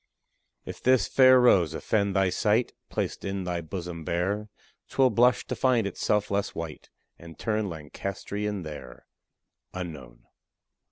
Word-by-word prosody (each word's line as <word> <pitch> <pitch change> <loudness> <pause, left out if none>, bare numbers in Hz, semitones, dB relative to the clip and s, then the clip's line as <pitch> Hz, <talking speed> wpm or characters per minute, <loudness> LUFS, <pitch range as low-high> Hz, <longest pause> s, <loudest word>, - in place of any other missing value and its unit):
If - - -8
this 130 -6 +3
fair 130 -1 +6
rose 90 -10 +4
offend 100 0 0
thy 95 -1 +3
sight, 105 +6 +1 0.2
Placed - - -3
in 95 -1 -3
thy 90 -1 -2
bosom 85 0 -6
bare, 95 +6 -1 0.4
'Twill 130 -2 +3
blush 120 +3 +3
to - - -4
find 125 -5 +2
itself 105 +1 0
less 100 0 -1
white, 80 -2 -7 0.3
And 85 -1 -12
turn 110 -2 -1
Lancastrian 100 +5 -5
there. 75 -5 -9 0.7
UNKNOWN. 75 -10 -8
100 Hz, 130 wpm, -27 LUFS, 85-105 Hz, 0.7 s, fair